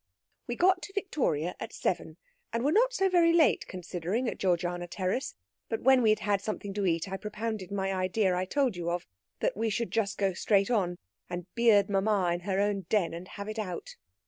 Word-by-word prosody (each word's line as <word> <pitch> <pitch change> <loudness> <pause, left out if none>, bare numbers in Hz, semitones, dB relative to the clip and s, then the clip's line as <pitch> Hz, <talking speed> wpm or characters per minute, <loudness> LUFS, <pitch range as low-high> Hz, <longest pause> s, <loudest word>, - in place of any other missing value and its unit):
"We 240 - -2
got 365 +3 +3
to 390 - -8
Victoria 255 - -1
at - - -6
seven, - - -2 0.3
and 230 +1 -1
were 290 - +3
not 480 +7 +4
so 385 -6 +2
very 345 -3 +4
late 320 -8 +3
considering 185 +6 -3
at - - -3
G. 185 -2 +3 0.3
Terrace; 185 +8 -2 0.3
but 225 - -2
when 265 0 +6
we 225 - +4
had 215 0 +3
had 205 -2 +1
something 205 -1 -4
to 200 -1 0
eat 165 0 0
I 195 0 -4
propounded 210 -2 -4
my 195 -1 -1
idea 185 +1 +1
I 180 +1 0
told 260 +1 +1
you 170 -1 -3
of, 175 0 -2 0.4
that - - +1
we 225 +2 0
should 230 +2 -2
just 210 -3 0
go 195 -2 +1
straight 200 +4 +2
on, 180 -6 +1 0.3
and 175 -1 -4
beard 220 -4 +5
mamma 195 -2 +2
in 175 - -2
her 190 +1 -1
own 200 -1 0
den, 200 -7 +2
and 170 +2 -7
have 200 +1 -7
it 215 +1 -4
out. 185 -5 -5
205 Hz, 210 wpm, -29 LUFS, 185-235 Hz, 0.4 s, when